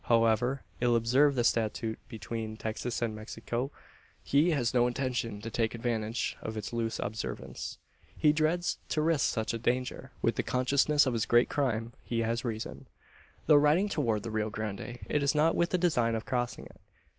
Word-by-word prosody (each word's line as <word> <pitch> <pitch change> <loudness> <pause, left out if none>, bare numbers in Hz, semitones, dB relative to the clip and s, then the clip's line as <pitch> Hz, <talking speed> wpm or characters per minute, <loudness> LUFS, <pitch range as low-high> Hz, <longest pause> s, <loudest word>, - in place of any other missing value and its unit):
However 115 +3 +3 0.2
ill 120 -1 +3
observed 130 +5 +4
the 120 - +2
statute 110 -1 0
between 110 0 -5
Texas 115 +2 -3
and 115 -2 -1
Mexico, 115 +4 -4 0.5
he 145 +5 +3
has 135 -7 +1
no 120 -1 +4
intention 120 -4 -2
to 115 +1 -6
take 115 0 0
advantage 115 -1 -1
of 110 0 -5
its 105 +2 -5
loose 115 -1 -1
observance. 110 +2 -5 0.4
He 150 -1 +4
dreads 160 +3 +1
to 155 - +1
risk 160 -3 +2
such 110 -1 -2
a 115 - -3
danger. 125 +2 -1
With - - +2
the - - +2
consciousness 140 +4 +3
of 130 - 0
his 115 -2 0
great 120 +1 +4
crime, 120 -5 -1
he 115 -1 -1
has 115 +2 -1
reason. 110 - -5 0.6
Though 150 -1 +7
riding 155 +8 +4
toward 115 - 0
the 115 - -4
Rio 110 0 -1
Grande, 110 +3 -5
it 150 - +1
is 140 +1 +2
not 155 +2 +4
with 170 - +2
the 180 - +1
design 125 -10 +2
of 110 - -4
crossing 125 -2 -2
it. - - -16
120 Hz, 180 wpm, -30 LUFS, 110-140 Hz, 0.6 s, Though